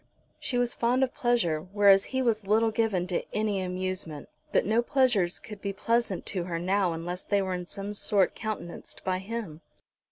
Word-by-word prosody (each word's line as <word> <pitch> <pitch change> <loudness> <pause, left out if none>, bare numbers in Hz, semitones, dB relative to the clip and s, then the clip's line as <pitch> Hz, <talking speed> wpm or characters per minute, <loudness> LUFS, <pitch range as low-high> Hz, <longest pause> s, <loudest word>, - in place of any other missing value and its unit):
She 255 -4 -1
was 245 -1 +2
fond 245 +3 +2
of 260 - 0
pleasure, 230 -11 +1
whereas 195 +2 +5
he 260 0 -1
was 220 -4 0
little 220 +2 +3
given 215 -5 +1
to 180 -1 -1
any 210 -2 0
amusement; 185 -4 -4 0.2
but - - +3
no 220 +3 +3
pleasures 240 -9 +2
could 210 -3 -10
be 200 -1 -2
pleasant 230 -1 0
to 180 -3 -2
her 170 -2 -3
now 185 +1 +1
unless 175 +3 -4
they 205 - +1
were 190 -1 -2
in 180 -1 -4
some 200 +1 -5
sort 200 -2 +2
countenanced 215 -6 -6
by 185 -1 0
him. 195 -6 -6
200 Hz, 185 wpm, -28 LUFS, 180-230 Hz, 0.2 s, whereas